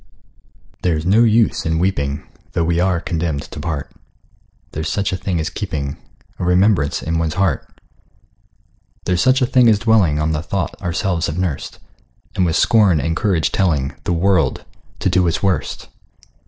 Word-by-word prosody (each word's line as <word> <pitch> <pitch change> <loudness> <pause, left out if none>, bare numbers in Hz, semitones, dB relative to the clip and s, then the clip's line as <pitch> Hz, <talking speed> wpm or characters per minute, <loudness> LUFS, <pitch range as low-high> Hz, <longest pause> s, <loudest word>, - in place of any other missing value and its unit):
There's 80 -3 0
no 105 +6 +5
use 115 0 +3
in 80 0 0
weeping, 70 -6 -1 0.3
Though 85 - +1
we 85 0 +1
are 90 -1 +2
condemned 80 -4 -2
to - - -9
part: 80 -2 -4 0.8
There's 80 0 -3
such 100 -2 -1
a - - +1
thing 90 -1 -2
as 80 +2 -2
keeping 75 -8 -4 0.4
A - - -3
remembrance 90 -4 +2
in 80 0 -1
one's 80 -1 -1
heart: 95 -3 0 1.3
There's 90 -1 +1
such 130 +1 +3
a - - +4
thing 125 -1 +4
as 110 - +4
dwelling 105 -9 +3
On 75 +1 0
the 75 -1 -1
thought 85 0 -3
ourselves 85 0 -1
have 75 - -4
nursed, 90 -7 -3 0.6
And 90 - +2
with 80 - 0
scorn 100 -4 +4
and 80 +4 -1
courage 95 -7 +1
telling 75 -9 0
The 90 - 0
world 90 0 +1 0.4
to - - +2
do 90 -1 +3
its 85 - -1
worst. 95 -3 -1
85 Hz, 170 wpm, -19 LUFS, 80-95 Hz, 1.3 s, no